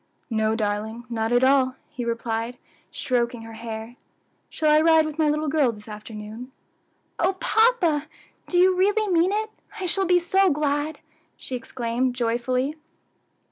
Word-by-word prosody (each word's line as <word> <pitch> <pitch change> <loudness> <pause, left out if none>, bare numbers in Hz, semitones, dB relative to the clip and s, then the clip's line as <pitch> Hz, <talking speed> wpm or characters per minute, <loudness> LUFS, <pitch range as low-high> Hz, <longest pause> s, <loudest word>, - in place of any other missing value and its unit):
"No, 220 0 +1
darling, 220 +2 -3
not 225 0 -1
at 245 +1 +3
all," 260 -1 +4
he 245 - -6
replied, 230 +1 -3 0.3
stroking 240 -2 -1
her 225 0 -10
hair. 225 +1 -7 0.5
"Shall 310 -1 +1
I 305 0 +6
ride 320 -1 +5
with 310 0 -6
my 310 -1 +3
little 305 +1 0
girl 285 -4 +2
this 210 -1 -13
afternoon?" 215 +3 -8 0.7
"Oh 365 +3 +2
papa! 375 -7 +2 0.4
do 355 - 0
you 370 +1 +5
really 415 +3 +2
mean 355 0 +3
it? 435 +1 -1 0.3
I 380 - -3
shall 380 +2 +1
be 360 0 +5
so 380 +2 +3
glad!" 295 0 -1 0.4
she 260 - -5
exclaimed 245 +1 -2
joyfully. 250 +4 -1
260 Hz, 150 wpm, -24 LUFS, 230-330 Hz, 0.7 s, I